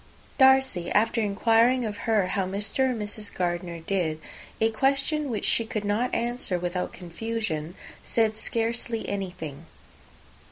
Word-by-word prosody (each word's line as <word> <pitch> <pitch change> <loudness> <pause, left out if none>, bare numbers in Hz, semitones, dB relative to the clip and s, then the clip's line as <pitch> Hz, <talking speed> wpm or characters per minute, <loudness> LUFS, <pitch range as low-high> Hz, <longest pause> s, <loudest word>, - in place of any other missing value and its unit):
Darcy, 265 -9 +5
after 225 +2 +3
inquiring 230 +4 +3
of 210 -1 -3
her 205 -5 +3
how 195 - 0
Mr. 205 +7 0
and 245 -3 -2
Mrs. 210 0 -5
Gardiner 175 -1 -2
did 165 -3 -1 0.4
a 225 0 +3
question 275 +5 +1
which 220 -4 -2
she 230 - +2
could 215 -2 -4
not 215 +5 0
answer 235 -5 0
without 180 +1 -2
confusion 180 -3 -4 0.3
said 220 -2 +1
scarcely 230 +1 -1
anything. 170 -6 -5
215 Hz, 130 wpm, -26 LUFS, 180-235 Hz, 0.4 s, Darcy